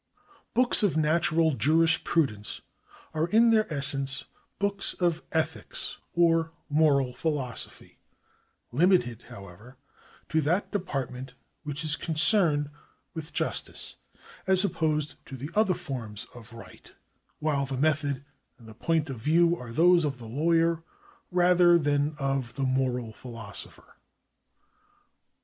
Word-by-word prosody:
Books 250 +1 +4
of 200 -7 +2
natural 160 +1 +2
jurisprudence 150 -4 +1 0.5
are 160 +1 0
in 230 +5 +5
their 215 -5 +2
essence 140 -1 +1 0.3
books 200 0 0
of 170 -2 0
ethics 160 -1 -2 0.2
or 165 -1 +3 0.2
moral 145 -4 +3
philosophy, 135 -3 -4 0.7
limited, 145 - +2
however, 100 +7 -12 0.5
to 160 0 +2
that 170 +7 0
de 205 - 0
partment 130 -6 -5 0.3
which 150 0 -5
is 155 -1 +1
concerned 155 -3 +2 0.4
with 160 -1 -7
justice, - - -4 0.5
as 190 0 +5
opposed 155 -4 -1
to 135 - -8
the 140 +6 -7
other 210 -3 +3
forms 115 -9 -6
of 115 -2 -13
right, 115 0 -13 0.4
while 145 -3 0
the 135 -1 -4
method 145 -2 0 0.3
and 115 - -16
the 110 - -11
point 160 +6 0
of 135 -4 -6
view 170 +7 +3
are 125 -7 -9
those 170 +6 +5
of 140 -3 -2
the 120 - -11
lawyer 165 +6 +1 0.5
rather 180 -1 +5
than 145 -1 0
of 135 -4 -2
the 135 - -2
moral 130 -3 0
philosopher. 115 -4 -10
150 Hz, 125 wpm, -27 LUFS, 130-165 Hz, 0.7 s, in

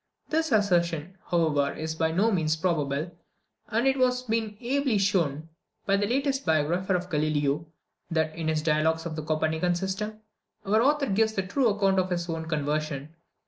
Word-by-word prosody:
This 320 0 0
assertion, 175 -5 +1
however, 155 -5 +2
is 160 0 -4
by 160 0 0
no 200 +7 +2
means 160 -5 +1
probable; 155 -2 -1 0.6
and 230 +3 0
it 270 0 +3
has 250 -1 +2
been 220 -3 -2
ably 260 -1 +1
shown, 165 -6 0 0.4
by 195 - +3
the 205 +1 +1
latest 270 +3 0
biographer 170 +4 +1
of 180 0 -3
Galileo, 150 0 0 0.4
that, 160 -1 0
in 165 -1 -3
his 155 -1 0
dialogues 160 +1 +1
on 165 - -4
the 155 - -4
Copernican 160 +3 0
system, 200 +4 -3 0.4
our 215 +3 +3
author 290 +2 +3
gives 220 -1 +1
the 195 - -1
true 240 +5 +2
account 195 -2 +2
of 185 0 0
his 175 -1 -2
own 165 -1 -4
conversion. 150 -1 -2
175 Hz, 170 wpm, -27 LUFS, 155-215 Hz, 0.6 s, it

